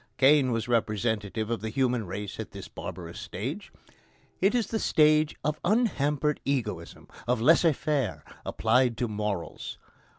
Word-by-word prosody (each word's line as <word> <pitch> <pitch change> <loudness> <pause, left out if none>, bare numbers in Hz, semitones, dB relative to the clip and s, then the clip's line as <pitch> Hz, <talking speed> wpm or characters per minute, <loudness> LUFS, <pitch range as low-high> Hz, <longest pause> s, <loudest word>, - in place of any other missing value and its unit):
Cain 135 -1 +5
was 115 -1 -1
representative 110 -1 0
of 115 - -1
the 110 - -3
human 125 -2 0
race 100 +2 -5
at - - -6
this - - -8
barbarous - - -7
stage. - - -5 0.7
It 195 +6 +3
is 235 -3 +2
the 220 +2 -2
stage 155 -3 +4
of 150 0 -1
unhampered 150 - +1
egoism, 105 -11 -3 0.2
of 125 -1 +2
laissez 160 +5 +5
faire 140 - -1 0.2
applied 120 +1 +2
to 120 - 0
morals. 105 -4 -4
125 Hz, 140 wpm, -28 LUFS, 110-150 Hz, 0.7 s, Cain